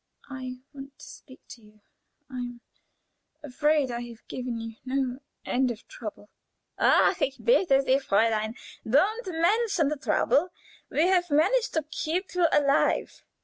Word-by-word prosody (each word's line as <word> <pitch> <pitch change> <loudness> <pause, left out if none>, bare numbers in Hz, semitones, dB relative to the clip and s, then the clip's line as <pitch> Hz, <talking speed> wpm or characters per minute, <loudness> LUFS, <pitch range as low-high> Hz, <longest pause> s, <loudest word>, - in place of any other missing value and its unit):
I 255 -1 -6 0.2
want 275 0 -11
to - - -13
speak 260 - -14
to 235 - -11
you. 210 0 -21 0.5
I 260 - -8
am 245 -1 -6 0.8
afraid 295 0 +1
I 235 - -3
have 235 -2 -13
given 245 -2 -4
you 225 0 -8
no 260 -1 -2 0.3
end 255 0 +1
of 235 -2 -7
trouble." 210 -2 -9 0.5
"Ach, 385 -2 +4
ich 270 -1 0
bitte 350 - +3
sie, 265 0 +3
Fräulein! 220 -2 +1 0.3
Don't 390 - +1
mention 360 -1 +1
the 300 - -3
trouble. 310 +3 +1 0.4
We 310 - +2
have 360 -1 +2
managed 390 +12 +2
to 320 - +1
keep 355 +6 -3
you 355 -2 +3
alive." 280 -1 +1
275 Hz, 145 wpm, -27 LUFS, 245-335 Hz, 0.8 s, Ach